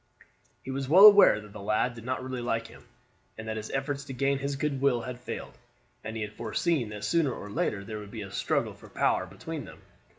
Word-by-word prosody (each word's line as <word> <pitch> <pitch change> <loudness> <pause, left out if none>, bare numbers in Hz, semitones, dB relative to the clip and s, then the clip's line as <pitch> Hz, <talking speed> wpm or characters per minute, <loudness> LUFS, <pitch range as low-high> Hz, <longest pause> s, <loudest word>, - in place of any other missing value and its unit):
He 135 - -5
was 135 0 -3
well 185 +6 +9
aware 205 - +9
that 105 -1 -13
the 110 - -8
lad 110 +4 +1
did 115 -1 -11
not 130 +1 -3
really 130 -1 -4
like 115 -1 -1
him, 115 +2 -14 0.5
and 110 0 -7
that 110 - -2
his 110 0 -6
efforts 140 +1 -2
to 135 - -7
gain 135 +2 +1
his 140 0 -2
good 135 -1 -2
will 130 -4 +3
had 125 +1 -6
failed, 125 - -7 0.5
and 110 +1 -6
he 110 - -2
had 105 0 -6
foreseen 120 +4 -1
that 105 -1 -7
sooner 165 -5 +2
or 105 -3 -7
later 100 -1 -1
there 110 0 -6
would 105 -1 -9
be 110 -1 -6
a 95 - -9
struggle - - -1
for - - -15
power - - +1
between - - -7
them. - - -13
120 Hz, 235 wpm, -28 LUFS, 110-140 Hz, 0.5 s, well